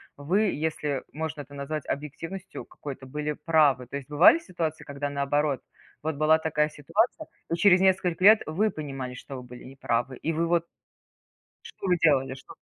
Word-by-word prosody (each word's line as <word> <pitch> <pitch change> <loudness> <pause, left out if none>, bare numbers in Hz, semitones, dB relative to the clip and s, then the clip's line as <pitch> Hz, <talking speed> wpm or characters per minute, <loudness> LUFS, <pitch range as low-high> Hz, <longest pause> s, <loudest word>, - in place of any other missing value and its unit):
вы, 165 +9 +1
если 150 -2 -2
можно 155 -1 -4
это 145 0 -13
назвать 140 +1 -4
объективностью 165 +6 -6
какой-то, 135 -2 -9
были 150 +3 -3
правы. 145 -6 +2
То 140 - -5
есть 135 - -9
бывали 160 - +7
ситуации, 170 - -4
когда 140 0 -4
наоборот, 140 0 0 0.4
вот 160 0 -2
была 155 +2 +4
такая 150 -1 +1
ситуация, 220 - -1 0.2
и 170 - +1
через 180 +1 +5
несколько 185 -2 +2
лет 215 +2 +8
вы 200 +8 +1
понимали, 135 -6 -6
что 135 +2 -9
вы 125 - -8
были 125 0 -12
не 130 +1 -11
правы, 120 0 -1
и 165 - -2
вы, 165 +2 0
вот 170 -1 +2 1.0
что 450 - -8
вы 180 -1 +3
делали, 135 -4 +3
что 130 - -13
150 Hz, 175 wpm, -27 LUFS, 140-170 Hz, 1.0 s, лет